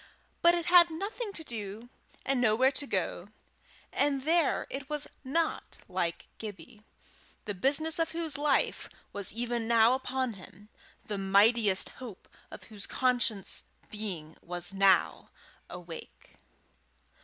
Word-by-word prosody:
But 340 0 +6
it 340 -1 -2
had 350 -1 +7
nothing 405 +7 -4
to 325 - -3
do, 220 -3 -6 0.4
and 265 -2 +1
nowhere 245 +3 +4
to 280 +1 -2
go, - - -1 0.7
and 280 -2 +1
there 325 0 +2
it 275 0 -5
was 295 -1 0 0.2
not 320 +5 -1
like 175 -2 -2
Gibbie, 210 +1 -9 0.6
the 205 - -2
business 295 - +2
of 330 - +2
whose 325 -2 -2
life 290 0 +1 0.2
was 200 -2 0
even 235 0 -2
now 230 +1 +5
upon 260 -1 -1
him, 200 +2 -14 0.4
the 205 -2 -3
mightiest 200 +1 +3
hope 230 -7 -9 0.2
of - - -10
whose 210 -2 -6
conscious 245 -6 0 0.3
being 180 -8 -6
was 175 +2 -3
now 195 -2 +3 0.4
awake. 175 -2 -10
235 Hz, 130 wpm, -30 LUFS, 200-290 Hz, 0.7 s, had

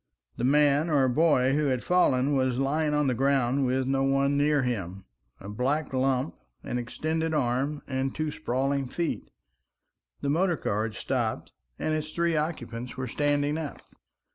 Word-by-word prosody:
The - - -3
man 145 +3 +3
or 140 -4 +3
boy 135 -1 +3
who 150 0 +1
had 130 -2 0
fallen 145 -6 +3
was 130 -2 +1
lying 150 +3 +1
on 150 0 +2
the 130 - +2
ground 135 +1 +2
with 130 +1 0
no 135 +1 +1
one 135 +1 +2
near 145 -1 +2
him, 100 -6 -3 0.3
a 100 - -10
black 135 +8 -1
lump, 130 -7 +1 0.3
an 125 - -2
extended 160 +6 -2
arm 135 +2 0
and 130 0 -2
two 155 -1 -2
sprawling 135 -1 -1
feet. 170 +5 -3 0.9
The - - -1
motor 175 +2 +2
car 105 -2 -1
had 110 -2 -6
stopped, - - -2 0.3
and 155 - -1
its 155 0 -3
three 170 -1 +1
occupants 125 -6 -3
were 130 - -2
standing 145 +3 0
up. 155 -3 -6
135 Hz, 165 wpm, -27 LUFS, 125-150 Hz, 0.9 s, man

